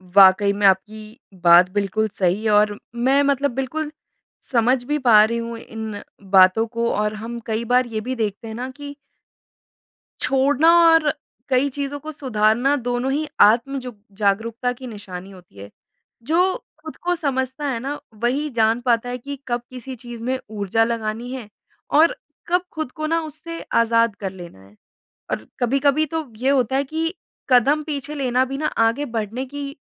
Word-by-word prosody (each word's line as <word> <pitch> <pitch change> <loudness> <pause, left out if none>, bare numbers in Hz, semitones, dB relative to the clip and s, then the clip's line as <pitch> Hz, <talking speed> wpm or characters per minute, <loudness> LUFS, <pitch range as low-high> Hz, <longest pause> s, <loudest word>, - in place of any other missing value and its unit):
वाक़ई 200 +1 +7
में 205 0 0
आपकी 215 +3 -1 0.2
बात 175 +1 +7
बिल्कुल 205 +2 0
सही 195 +4 +1
और 210 0 +3 0.2
मैं 265 +4 +3
मतलब 280 0 +1
बिल्कुल 295 +3 -3 0.6
समझ 245 +1 +2
भी 295 +2 0
पा 220 -5 +6
रही 235 +1 -2
हूँ 230 0 -5
इन 220 -3 -7 0.3
बातों 190 +3 +6
को, 235 0 -1
और 210 +1 0
हम 225 +2 -6
कई 225 +1 -2
बार 250 +2 +3
ये 220 -2 -4
भी 255 +4 -4
देखते 220 -1 -3
हैं 220 - -6
ना 250 +2 -4
कि 285 +2 -9 1.3
छोड़ना 280 +4 +3 0.2
और 320 -2 +4 0.4
कई 265 +2 +2
चीज़ों 285 +1 -4
को 310 +2 -7
सुधारना 245 -1 +1
दोनों 245 0 -2
ही 300 +2 -1
आत्म 240 +6 +4
जो 250 -2 -8 0.2
जागरूकता 225 +4 0
की 255 +1 -10
निशानी 195 -3 -9
होती 180 - -17
है। 100 - -9 0.5
जो 355 +7 +2 0.3
खुद 315 - -8
को 355 0 -1
समझता 270 -3 -2
है 245 -4 -1
ना, 280 +4 -4
वही 250 +7 -1
जान 230 -1 +1
पाता 240 0 +1
है 250 - -3
कि 280 +3 -7
कब 240 -1 -1
किसी 255 +1 -8
चीज़ 240 -1 -9
में 260 +1 -1
ऊर्जा 210 +1 0
लगानी 230 +1 -3
है 250 -5 -7 0.5
और 325 +2 +5 0.3
कब 360 +1 +1
खुद 315 -5 -4
को 310 0 -4
ना 330 +1 +1
उससे 330 +2 -8 0.2
आज़ाद 230 -1 +2
कर 195 -2 -4
लेना 175 - -11
है। 100 +2 -20 0.6
और 110 - -3
कभी-कभी 275 +5 +2
तो 320 +1 -4
ये 260 +3 0
होता 265 -2 +2
है 275 - +2
कि 320 +4 -3 0.4
कदम 275 +5 +4
पीछे 295 -1 -5
लेना 255 -2 +1
भी 270 +1 -5
ना 305 - -1 0.2
आगे 275 +6 -1
बढ़ने 230 +1 -4
की 280 +1 -7
245 Hz, 175 wpm, -21 LUFS, 220-280 Hz, 1.3 s, वाक़ई